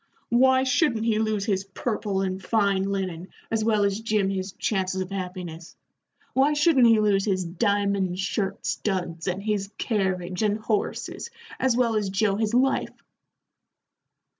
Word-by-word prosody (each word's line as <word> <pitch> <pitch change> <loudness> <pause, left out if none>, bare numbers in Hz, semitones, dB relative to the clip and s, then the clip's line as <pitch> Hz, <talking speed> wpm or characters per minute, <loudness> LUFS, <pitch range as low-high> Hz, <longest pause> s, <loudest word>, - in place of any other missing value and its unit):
Why 260 +2 +4
shouldn't 255 -4 +1
he 220 -2 +2
lose 215 -2 0
his 195 -3 0
purple 200 0 -2
and 190 0 -3
fine 200 -2 +1
linen 185 -3 -3 0.2
as 220 -1 +1
well 215 -2 +2
as 200 +1 +1
Jim 215 -3 0
his 190 -1 -3
chances 190 -2 -1
of 185 0 -4
happiness? 180 -3 -6 0.6
Why 275 +3 +3
shouldn't 295 -4 +5
he 225 -1 +5
lose 205 -2 +2
his 190 -3 0
diamond 200 0 0
shirt 195 +1 -2
studs, 175 -4 -2
and 190 +2 -2
his 205 -2 -1
carriage 185 -4 -1
and 210 -1 +2
horses, 215 - -3 0.3
as 255 -2 +2
well 235 -3 +2
as 210 -2 0
Joe 195 +1 +1
his 220 +2 0
life?" 265 +2 +1
200 Hz, 150 wpm, -25 LUFS, 190-225 Hz, 0.6 s, shouldn't